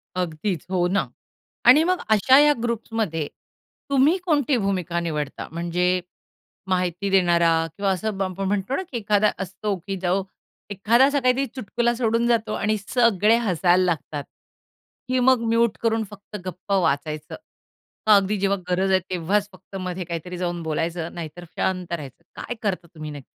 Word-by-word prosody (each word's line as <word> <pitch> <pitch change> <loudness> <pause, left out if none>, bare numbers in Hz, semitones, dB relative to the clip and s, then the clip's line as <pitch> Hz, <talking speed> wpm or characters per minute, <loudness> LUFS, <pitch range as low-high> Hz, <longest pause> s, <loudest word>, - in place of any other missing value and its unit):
अगदीच. 175 0 -2
हो 175 -1 +2
ना. 190 -7 0 0.6
आणि 275 +6 +8
मग 365 +1 +1
अशा 220 +5 +5
ह्या 295 0 +6
ग्रुप्समध्ये 220 -9 -2 0.6
तुम्ही 280 +6 +4
कोणती 290 -6 +2
भूमिका 185 -4 -1
निवडता? 150 -4 -4
म्हणजे 180 +2 0 0.7
माहिती 185 +1 0
देणारा 175 -3 +4 0.3
किंवा 200 -1 +1
असं 200 +2 -2
बं 195 - 0
आपण 195 +2 -4
म्हणतो 205 +5 -1
ना - - -1
की 240 - -2
एखादा 210 -1 +2
असतो 195 +2 -3
की 195 - -2
जो 185 +2 +1 0.5
एखादा 225 +6 +4
असा 285 0 +2
काहीतरी 255 +1 +2
चुटकुला 240 +1 0
सोडून 230 0 +1
जातो 225 -2 +1
आणि 215 0 0
सगळे 230 -3 +4
हसायला 185 -4 +2
लागतात, 155 -4 -2 0.9
की 255 0 +2
मग 260 0 +4
म्युट 230 -1 +2
करून 225 -1 +1
फक्त 205 +1 -10
गप्प 185 +2 -7
वाचायचं? 155 -4 0 0.7
मग 215 - +8
अगदी 200 +1 +2
जेव्हा 200 +1 +1
गरज 190 +2 +1
आहे 190 - +5
तेव्हाच 195 +4 0
फक्त 185 +1 -15
मध्ये 185 -1 -4
काहीतरी 175 +2 -5
जाऊन 175 -1 -3
बोलायचं, 165 +2 -2
नाहीतर 170 +1 -7
शांत 180 -2 -2
राहायचं. 145 -6 -6
काय 245 - -5
करता 185 -4 -2
तुम्ही 155 -1 -7
नक्की? 145 -3 -9
195 Hz, 155 wpm, -23 LUFS, 175-225 Hz, 0.9 s, आणि